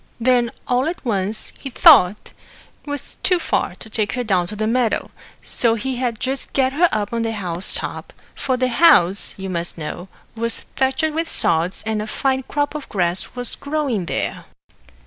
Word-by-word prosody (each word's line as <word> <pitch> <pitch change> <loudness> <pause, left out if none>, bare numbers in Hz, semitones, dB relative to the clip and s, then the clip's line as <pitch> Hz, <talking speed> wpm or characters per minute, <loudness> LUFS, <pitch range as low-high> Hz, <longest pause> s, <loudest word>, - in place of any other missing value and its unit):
Then 240 0 +3 0.2
all 250 +2 +1
at 335 -3 -5
once 210 -1 -1
he 275 - -6
thought 225 - +5 0.5
'twas 290 -1 -6
too 365 - +3
far 190 - -1
to 220 - -11
take 215 -1 -1
her 250 - -2
down 185 -6 +1
to 210 - -6
the 215 +1 -1
meadow, 235 0 0 0.3
so 230 -2 +2
he'd 245 -1 -2
just 270 +1 -3
get 265 -1 +2
her 340 +4 +4
up 210 +1 -2
on 230 - 0
the 225 0 -1
house 180 -4 -3
top - - -2 0.2
for 260 -1 -1
the 255 0 +1
house, 205 - +4
you 190 0 -5
must 175 -2 -3
know, 165 +3 -6 0.3
was 230 0 -3
thatched 265 +4 +1
with 325 +1 -2
sods, 170 +3 +2
and 220 -1 -1
a 215 - -5
fine 265 +3 0
crop 290 +3 -2
of 300 -2 -7
grass 180 +1 -1
was 245 -1 -1
growing 280 - -2
there. - - -3
230 Hz, 180 wpm, -20 LUFS, 200-265 Hz, 0.5 s, thought